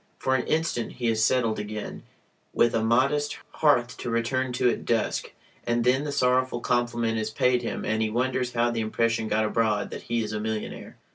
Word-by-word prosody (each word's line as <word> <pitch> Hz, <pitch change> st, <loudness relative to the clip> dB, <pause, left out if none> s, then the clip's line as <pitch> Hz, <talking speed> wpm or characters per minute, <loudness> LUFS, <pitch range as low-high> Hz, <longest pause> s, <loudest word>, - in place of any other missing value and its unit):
For 130 Hz, -, 0 dB
an 130 Hz, -2 st, 0 dB
instant 155 Hz, -8 st, -1 dB
he 120 Hz, -2 st, -1 dB
is 110 Hz, -1 st, +1 dB
settled 115 Hz, -2 st, +2 dB
again, 105 Hz, 0 st, -6 dB, 0.5 s
with 120 Hz, -1 st, +3 dB
a 115 Hz, -, +1 dB
modest 135 Hz, +6 st, +2 dB
hearth 125 Hz, -5 st, +2 dB
to -, -, -5 dB
return 125 Hz, +3 st, 0 dB
to 125 Hz, 0 st, +2 dB
at -, -, -4 dB
dusk... 115 Hz, -2 st, -1 dB, 0.3 s
and 120 Hz, 0 st, 0 dB
then 130 Hz, +4 st, +2 dB
the 145 Hz, -, -2 dB
sorrowful 130 Hz, -2 st, +2 dB
compliment 120 Hz, -2 st, 0 dB
is 110 Hz, 0 st, -2 dB
paid 125 Hz, +2 st, +2 dB
him -, -, -4 dB
and 110 Hz, 0 st, 0 dB
he 110 Hz, -, +1 dB
wonders 125 Hz, +2 st, -1 dB
how 120 Hz, 0 st, +2 dB
the 115 Hz, -1 st, -1 dB
impression 115 Hz, +1 st, 0 dB
got 110 Hz, 0 st, +1 dB
abroad 105 Hz, -2 st, 0 dB
that -, -, -6 dB
he 115 Hz, -1 st, -1 dB
is 110 Hz, 0 st, -5 dB
a 105 Hz, -, -2 dB
millionaire. 110 Hz, 0 st, -5 dB
120 Hz, 200 wpm, -26 LUFS, 110-125 Hz, 0.5 s, with